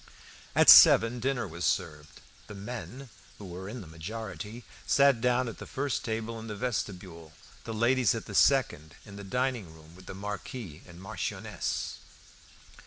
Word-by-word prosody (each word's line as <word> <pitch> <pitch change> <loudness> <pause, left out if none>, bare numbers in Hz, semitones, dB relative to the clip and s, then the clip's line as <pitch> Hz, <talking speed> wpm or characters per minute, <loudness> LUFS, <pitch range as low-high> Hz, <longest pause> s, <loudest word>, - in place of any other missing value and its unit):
At - - +4
seven 115 +2 +8
dinner 125 -2 -1
was 85 0 -7
served. 75 0 -2 0.3
The 105 - -9
men, 125 +5 -8 0.3
who 105 - -10
were 95 +2 -8
in 120 +2 -7
the - - -10
majority, 105 +6 -7 0.2
sat 140 -4 +4
down 125 +1 +1
at 115 - -7
the - - -9
first 140 +1 -2
table 115 -1 -4
in 110 - -9
the 105 - -5
vestibule; 95 -8 -5 0.3
the 115 - -5
ladies 120 +1 +2
at 115 - -6
the - - -9
second 115 - +2
in 100 -2 -12
the 100 - -9
dining 125 -3 -2
room 80 +1 -17
with 90 0 -16
the - - -7
Marquis 100 - -7
and 85 -1 -13
Marchioness. 95 +1 -4
110 Hz, 165 wpm, -29 LUFS, 90-125 Hz, 0.3 s, seven